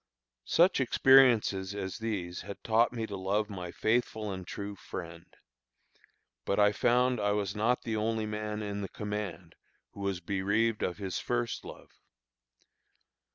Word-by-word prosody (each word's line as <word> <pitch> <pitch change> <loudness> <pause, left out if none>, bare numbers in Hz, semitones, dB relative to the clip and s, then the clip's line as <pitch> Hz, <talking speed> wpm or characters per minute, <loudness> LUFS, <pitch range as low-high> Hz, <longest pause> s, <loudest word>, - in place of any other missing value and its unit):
Such 175 -3 +4
experiences 120 -7 +4
as 95 +1 -4
these 95 -6 -3
had 100 - -9
taught 115 +1 +3
me 115 -2 -3
to 105 - -6
love 100 +3 -1
my 90 -3 -5
faithful 110 -2 0
and 95 -2 -6
true 100 0 -5
friend. 85 -3 -8 1.2
But 100 - 0
I 105 0 +6
found 125 +3 +2
I 105 0 +1
was 100 -1 -2
not 115 +4 +1
the 110 -2 -2
only 110 0 0
man 105 0 -4
in 100 0 -4
the 100 - -4
command 100 -5 -5 0.4
who - - -13
was 100 -2 -2
bereaved 100 +5 0
of 90 - -1
his 95 -2 -3
first 120 -1 -2
love. - - -11
105 Hz, 150 wpm, -30 LUFS, 95-115 Hz, 1.2 s, I